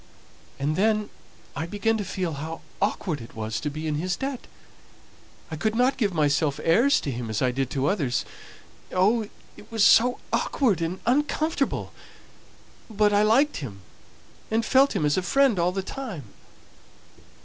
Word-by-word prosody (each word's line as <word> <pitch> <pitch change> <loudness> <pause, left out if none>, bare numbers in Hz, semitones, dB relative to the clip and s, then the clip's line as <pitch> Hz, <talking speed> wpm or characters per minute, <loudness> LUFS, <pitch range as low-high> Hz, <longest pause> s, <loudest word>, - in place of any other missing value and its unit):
And 145 +3 -1
then 215 +2 +1 0.4
I 160 +3 -3
began 210 +4 0
to - - -1
feel 185 -3 -3
how 160 +3 -6 0.2
awkward 185 - -1
it 115 - -12
was 110 0 -3
to 150 - -3
be 155 +2 -6
in 155 - -1
his 180 0 -1
debt. 270 +2 -5 1.0
I - - -3
couldn't 225 - +1
give 210 -6 +1
myself 150 -2 +1
airs 235 - +4
to 140 - -3
him 120 -2 -5
as 110 - -1
I 130 -1 +2
did 135 0 -2
to 135 0 -1
others. 145 -8 0 0.7
Oh! 210 +4 +2 0.3
it 210 - -15
was 225 -2 +2
so 245 +4 +6 0.2
awkward 220 - +1
and 170 +3 -3
uncomfortable! 295 +3 0 1.0
But 210 -1 +2
I 205 - +4
liked 245 +8 +3
him, 105 -9 -7 0.7
and 225 +1 0
felt 270 +3 +4
him 150 - +1
as 145 +3 +2
a - - +2
friend 250 +2 +3
all 175 +1 +2
the 195 +1 -3
time. 220 - -6
190 Hz, 160 wpm, -25 LUFS, 150-225 Hz, 1.0 s, so